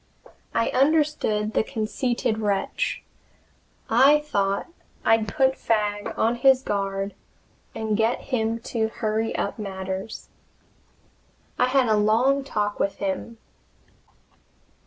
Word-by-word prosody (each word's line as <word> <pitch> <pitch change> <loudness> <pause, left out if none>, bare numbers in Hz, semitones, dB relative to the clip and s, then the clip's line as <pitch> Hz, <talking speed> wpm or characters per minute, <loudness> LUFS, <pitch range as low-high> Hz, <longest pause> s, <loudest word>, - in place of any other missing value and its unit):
I 230 - +2
understood 270 -7 +1
the - - +2
conceited 220 0 -1
wretch. 210 - -1 0.8
I 270 +6 +6
thought 200 -9 -1 0.4
I'd 225 -1 +3
put 265 +5 +2
Fagg 210 -2 0
on 230 +2 +1
his 265 0 +4
guard 195 -1 -2 0.6
and 220 -1 -1
get 225 +3 +1
him 225 -1 +1 0.2
to 220 -2 +1
hurry 220 0 -2
up 200 - -3
matters. 190 0 -5 1.3
I 250 - +4
had 260 -1 +3
a 220 - +3
long 240 +7 +3
talk 210 -6 -2
with 200 - 0
him. 200 +4 -4
220 Hz, 110 wpm, -24 LUFS, 205-255 Hz, 1.3 s, I